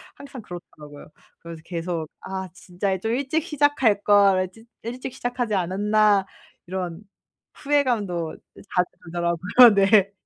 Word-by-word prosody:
항상 275 Hz, -3 st, -10 dB
그렇더라고요. 155 Hz, -6 st, -12 dB, 0.3 s
그래서 165 Hz, -1 st, -10 dB
계속 170 Hz, -2 st, -4 dB
'아 190 Hz, -1 st, -6 dB
진짜 190 Hz, 0 st, -3 dB
좀 225 Hz, +4 st, -2 dB
일찍 280 Hz, +5 st, -1 dB
시작할 290 Hz, -, +1 dB
걸 195 Hz, -3 st, +4 dB
찌 225 Hz, +4 st, -18 dB, 0.2 s
일찍 245 Hz, +2 st, -6 dB
시작하지 245 Hz, -3 st, -3 dB
않았나.' 200 Hz, +2 st, +2 dB, 0.4 s
이런 180 Hz, -1 st, -5 dB, 0.5 s
후회감도 225 Hz, -, -1 dB, 0.3 s
자주 180 Hz, -1 st, +1 dB, 0.2 s
들더라고요. 175 Hz, +7 st, +4 dB
네. 200 Hz, 0 st, +4 dB
200 Hz, 275 characters per minute, -23 LUFS, 175-240 Hz, 0.5 s, 걸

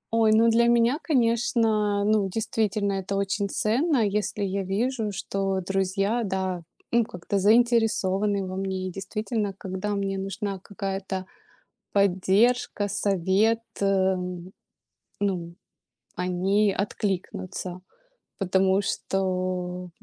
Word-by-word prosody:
Ой, 220 Hz, -1 st, +4 dB
ну 225 Hz, +2 st, +5 dB
для 235 Hz, +1 st, +4 dB
меня, 240 Hz, +5 st, +3 dB
конечно, 230 Hz, -6 st, +2 dB
ну, 210 Hz, -2 st, +2 dB
действительно, 210 Hz, -1 st, 0 dB
это 195 Hz, 0 st, -3 dB
очень 200 Hz, +1 st, -1 dB
ценно, 240 Hz, -, +2 dB
если 205 Hz, 0 st, -1 dB
я 195 Hz, 0 st, -1 dB
вижу, 215 Hz, +4 st, -1 dB
что 195 Hz, 0 st, -2 dB
друзья, 195 Hz, +4 st, 0 dB
да, 190 Hz, -3 st, -2 dB, 0.3 s
ну, 235 Hz, 0 st, +4 dB
как-то 195 Hz, 0 st, -3 dB
заинтересованы 210 Hz, -3 st, +3 dB
во 185 Hz, 0 st, -5 dB
мне. 190 Hz, -1 st, -2 dB
И -, -, -7 dB
действительно, 205 Hz, +2 st, -3 dB
когда 190 Hz, +2 st, -3 dB
мне 195 Hz, -1 st, -2 dB
нужна 195 Hz, 0 st, -4 dB
какая-то 195 Hz, -1 st, -4 dB, 0.7 s
поддержка, 200 Hz, +3 st, +2 dB
совет, 200 Hz, +3 st, +1 dB, 0.2 s
э, 190 Hz, -1 st, +3 dB, 1.1 s
ну, 180 Hz, -4 st, -2 dB, 0.6 s
они 190 Hz, +3 st, +1 dB
откликнутся. 185 Hz, -2 st, -3 dB, 0.6 s
Потому 190 Hz, 0 st, +2 dB
что, 185 Hz, -2 st, -2 dB
200 Hz, 105 wpm, -26 LUFS, 190-215 Hz, 1.1 s, ну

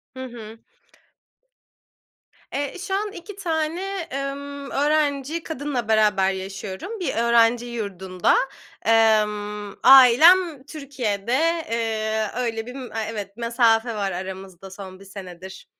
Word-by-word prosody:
Hı 260 Hz, -, -6 dB
hı. 225 Hz, -2 st, -10 dB, 1.9 s
Eee, 285 Hz, +4 st, -3 dB
şu 385 Hz, +1 st, -5 dB
an 415 Hz, 0 st, -2 dB
2 375 Hz, +3 st, -10 dB
tane, 330 Hz, -2 st, -2 dB, 0.3 s
emm, 280 Hz, 0 st, -5 dB
öğrenci 295 Hz, +1 st, 0 dB
kadınla 280 Hz, -6 st, -4 dB
beraber 210 Hz, -3 st, +3 dB
yaşıyorum 195 Hz, -, -6 dB
bir 355 Hz, -, -2 dB
öğrenci 235 Hz, +1 st, +3 dB
yurdunda. 190 Hz, -6 st, -1 dB, 0.5 s
Emm, 210 Hz, -2 st, +2 dB
ailem 275 Hz, +4 st, +7 dB
Türkiye'de, 250 Hz, -8 st, -4 dB, 0.4 s
eee, 220 Hz, -1 st, -1 dB
öyle 230 Hz, -2 st, -2 dB
bir 250 Hz, +2 st, -9 dB
m 260 Hz, -2 st, -7 dB, 0.2 s
evet, 205 Hz, -1 st, -7 dB
mesafe 230 Hz, -1 st, +2 dB
var 200 Hz, -2 st, -1 dB
aramızda 190 Hz, 0 st, -7 dB
son 190 Hz, -1 st, -10 dB
1 195 Hz, -, -14 dB
senedir. 190 Hz, -1 st, -10 dB
230 Hz, 110 wpm, -23 LUFS, 205-280 Hz, 1.9 s, ailem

